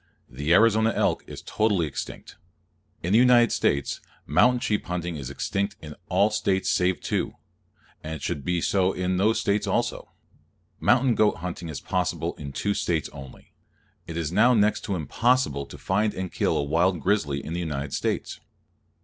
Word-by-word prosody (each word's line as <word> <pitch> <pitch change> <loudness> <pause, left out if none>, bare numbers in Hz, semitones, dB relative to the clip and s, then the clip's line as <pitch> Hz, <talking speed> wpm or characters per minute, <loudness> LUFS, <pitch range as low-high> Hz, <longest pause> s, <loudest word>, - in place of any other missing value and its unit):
The 70 +5 -3
Arizona 110 +3 +5
elk - - +1
is - - -9
totally 105 -6 +1
extinct. 75 - -7 0.7
In 90 +4 0
the 110 - +6
United 120 -2 +5
States, 70 -1 0 0.2
mountain 125 0 +4
sheep 105 -3 -1
hunting 90 -1 -3
is 70 -4 -6
extinct 100 +8 -2
in 75 -1 -9 0.2
all 105 +2 +3
States 95 -2 0
save 90 0 +1
two: - - -2 0.7
and 80 +1 -5
it 75 - -9
should 70 - -3
be 90 +3 0
so 95 +1 +2
in 90 0 -1
those 110 +3 +1 0.2
also. - - -1 0.7
Mountain 125 0 +3
goat 110 -1 +3
hunting 85 -1 -6
is 75 - -5
possible - - -1
in 70 -2 -7
two 100 +9 -1
States 85 -6 -1
only. 70 -2 -12 0.5
It 85 - -6
is 80 -2 -2
now 120 +7 +4
next 105 0 +2
to 100 - -2
impossible 85 - +1
to - - -11
find 105 +3 0
and 95 -1 -4
kill - - +1
a - - 0
wild 85 +5 +1
grizzly 75 -6 0
in 80 - -5
the 85 - -2
United 75 -4 -4
States. - - -2
90 Hz, 170 wpm, -25 LUFS, 75-105 Hz, 0.7 s, the